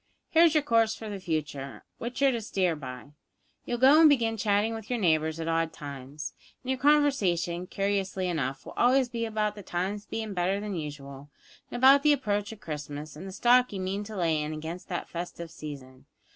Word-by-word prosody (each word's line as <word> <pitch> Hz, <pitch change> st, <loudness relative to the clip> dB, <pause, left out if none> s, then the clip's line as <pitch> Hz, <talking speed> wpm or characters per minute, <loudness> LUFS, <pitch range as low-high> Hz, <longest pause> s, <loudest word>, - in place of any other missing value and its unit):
Here's 330 Hz, -1 st, +5 dB
your 305 Hz, -, +4 dB
course 230 Hz, -4 st, +3 dB
for 220 Hz, -, -7 dB
the 200 Hz, -1 st, -5 dB
future, 150 Hz, -6 st, -4 dB, 0.2 s
which 245 Hz, +4 st, -3 dB
you're 275 Hz, -, +6 dB
to 235 Hz, -2 st, -2 dB
steer 185 Hz, -5 st, 0 dB
by. 130 Hz, -1 st, -9 dB, 0.5 s
You'll 240 Hz, -, -2 dB
go 270 Hz, +5 st, +7 dB
an' 320 Hz, -, +9 dB
begin 235 Hz, -6 st, +3 dB
chatting 210 Hz, +1 st, +1 dB
with 225 Hz, -2 st, -7 dB
your 245 Hz, -, 0 dB
neighbours 160 Hz, -5 st, +1 dB
at 165 Hz, -, -3 dB
odd 165 Hz, 0 st, +1 dB
times, 140 Hz, +1 st, -7 dB, 0.3 s
and 260 Hz, -, -2 dB
your 260 Hz, -, -1 dB
conversation, 200 Hz, -, +2 dB
curiously 195 Hz, -1 st, -1 dB
enough, 135 Hz, -6 st, -2 dB
will -, -, -9 dB
always 255 Hz, +1 st, +3 dB
be 230 Hz, -1 st, -2 dB
about 215 Hz, -1 st, -1 dB
the 210 Hz, -, -10 dB
times 195 Hz, +3 st, -3 dB
bein' 220 Hz, -2 st, -4 dB
better 185 Hz, +2 st, 0 dB
than 205 Hz, -1 st, -4 dB
usual, 145 Hz, -3 st, -7 dB, 0.4 s
an' -, -, -5 dB
about 270 Hz, +3 st, +7 dB
the 300 Hz, 0 st, +5 dB
approach 205 Hz, -6 st, -1 dB
of 220 Hz, -, -10 dB
Christmas, 150 Hz, -2 st, -6 dB
an' 165 Hz, +5 st, -8 dB
the -, -, -6 dB
stock 245 Hz, +5 st, +4 dB
you 200 Hz, -, -4 dB
mean 190 Hz, +2 st, -2 dB
to 215 Hz, +1 st, -8 dB
lay 165 Hz, -4 st, +1 dB
in 150 Hz, +1 st, -3 dB
against 160 Hz, +3 st, -7 dB
that 175 Hz, -, -3 dB
festive 170 Hz, -1 st, -6 dB
season. 135 Hz, -5 st, -10 dB
195 Hz, 200 wpm, -28 LUFS, 155-230 Hz, 0.5 s, an